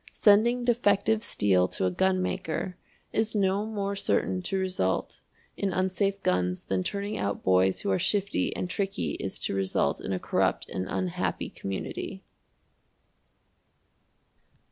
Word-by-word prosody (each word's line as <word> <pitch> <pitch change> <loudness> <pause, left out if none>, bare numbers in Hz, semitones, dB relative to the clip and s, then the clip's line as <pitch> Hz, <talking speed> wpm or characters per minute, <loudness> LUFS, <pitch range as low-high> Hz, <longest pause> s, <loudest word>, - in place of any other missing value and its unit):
Sending 235 +4 +4
defective 220 -2 +3
steel 95 - +2
to 95 - -2
a 90 - +2
gunmaker 185 - 0 0.4
is 220 0 0
no 200 +1 +1
more 200 -2 -2
certain 185 -1 0
to 190 +2 -2
result 185 - -1 0.4
in 195 - -1
unsafe 190 +2 0
guns 90 0 +1
than 95 -1 -1
turning 200 - -3
out 100 0 -2
boys 95 0 +3
who 100 - 0
are 95 - +2
shifty 200 -1 +1
and - - -2
tricky 195 +1 -2
is 95 - -4
to - - -2
result 95 -1 0
in - - -4
a 95 - 0
corrupt - - 0
and 95 0 -3
unhappy 95 -2 -2
community. 95 -1 -5
185 Hz, 135 wpm, -28 LUFS, -, 0.4 s, Sending